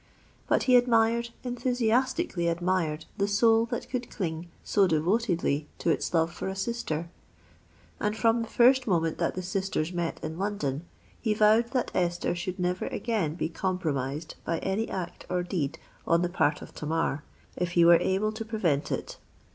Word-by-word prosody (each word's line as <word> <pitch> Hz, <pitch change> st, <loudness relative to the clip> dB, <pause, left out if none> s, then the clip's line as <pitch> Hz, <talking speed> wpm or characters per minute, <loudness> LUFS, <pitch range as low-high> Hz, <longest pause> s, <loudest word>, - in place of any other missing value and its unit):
But -, -, +2 dB
he 255 Hz, -1 st, +6 dB
admired—enthusiastically 235 Hz, -, +1 dB
admired 170 Hz, -2 st, 0 dB
the 200 Hz, -, +2 dB
soul 225 Hz, +2 st, +4 dB
that -, -, -4 dB
could 250 Hz, -2 st, -4 dB
cling 170 Hz, -3 st, -4 dB
so 200 Hz, -2 st, +3 dB
devotedly 170 Hz, -3 st, +1 dB
to 170 Hz, -, +1 dB
its -, -, -1 dB
love 165 Hz, 0 st, +1 dB
for -, -, -5 dB
a 190 Hz, -, -3 dB
sister; 180 Hz, -6 st, -3 dB, 0.9 s
and 210 Hz, +1 st, -1 dB
from 230 Hz, +1 st, +3 dB
the 225 Hz, -, -4 dB
first 255 Hz, +3 st, +4 dB
moment 165 Hz, -4 st, +1 dB
that -, -, 0 dB
the 185 Hz, -, -4 dB
sisters 185 Hz, -3 st, -2 dB
met 170 Hz, -1 st, -2 dB
in 160 Hz, +2 st, -5 dB
London, 175 Hz, -7 st, -2 dB, 0.3 s
he 215 Hz, -3 st, +1 dB
vowed 220 Hz, +2 st, +4 dB
that 250 Hz, -2 st, 0 dB
Esther 175 Hz, -1 st, 0 dB
should 175 Hz, +1 st, -4 dB
never 180 Hz, 0 st, -1 dB
again 205 Hz, -10 st, -1 dB
be 175 Hz, -, -1 dB
compromised 160 Hz, -4 st, -2 dB
by 165 Hz, -, -1 dB
any 200 Hz, +4 st, -1 dB
act 180 Hz, -2 st, -5 dB
or 180 Hz, -1 st, 0 dB
deed 165 Hz, -4 st, -2 dB, 0.3 s
on 170 Hz, +1 st, +3 dB
the 175 Hz, -, 0 dB
part 155 Hz, -4 st, +1 dB
of -, -, -12 dB
Tamar, 155 Hz, -1 st, -1 dB, 0.3 s
if 175 Hz, -1 st, -2 dB
he 170 Hz, -1 st, +5 dB
were 170 Hz, 0 st, +8 dB
able 195 Hz, +3 st, +1 dB
to 220 Hz, +1 st, -5 dB
prevent 190 Hz, -11 st, 0 dB
it. -, -, -4 dB
185 Hz, 165 wpm, -28 LUFS, 165-225 Hz, 0.9 s, were